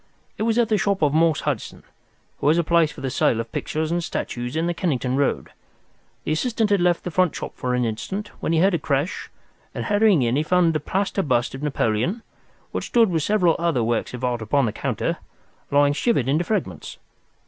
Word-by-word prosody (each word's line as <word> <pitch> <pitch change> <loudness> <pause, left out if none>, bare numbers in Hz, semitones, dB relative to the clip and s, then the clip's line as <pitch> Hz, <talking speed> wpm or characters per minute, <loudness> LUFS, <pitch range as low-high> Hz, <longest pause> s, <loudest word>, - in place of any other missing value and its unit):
"It 220 +2 +1
was 225 - +1
at 235 -2 +2
the 215 -2 +2
shop 200 -4 0
of 145 -1 +3
Morse 160 -1 +3
Hudson, 140 -7 -4 0.6
who - - 0
has 155 +3 +4
a 170 - +2
place 165 -1 +3
for - - -11
the 135 -1 -3
sale 115 - +2
of 115 0 -5
pictures 155 +1 -2
and 175 0 0
statues 120 -5 -4
in 160 +1 0
the 175 - 0
Kennington 135 -6 -1
Road. 140 0 0 0.7
The - - -3
assistant 220 +5 0
had 200 -3 +3
left 175 -1 +2
the 180 - -4
front 180 -3 +2
shop - - -6
for 125 0 -2
an 125 -1 +1
instant, 190 - -4
when - - -2
he 165 - +2
heard 190 +4 +4
a 170 - +1
crash, 145 +4 -2 0.5
and - - -3
hurrying 205 - +3
in 120 +2 +1
he - - +2
found 170 0 +2
a - - +2
plaster 195 +6 -1
bust 125 -7 0
of 135 - -7
Napoleon, 145 - -1 0.5
which - - -3
stood 230 -5 +3
with 165 -2 +1
several 180 -2 +2
other 165 -8 +1
works 115 +2 -1
of 125 - -9
art 120 -2 -1
upon 130 +5 +1
the 110 - -1
counter, - - -2 0.5
lying 145 0 +4
shivered 150 - +1
into 150 +5 +2
fragments. 170 - -3
160 Hz, 215 wpm, -23 LUFS, 130-185 Hz, 0.7 s, has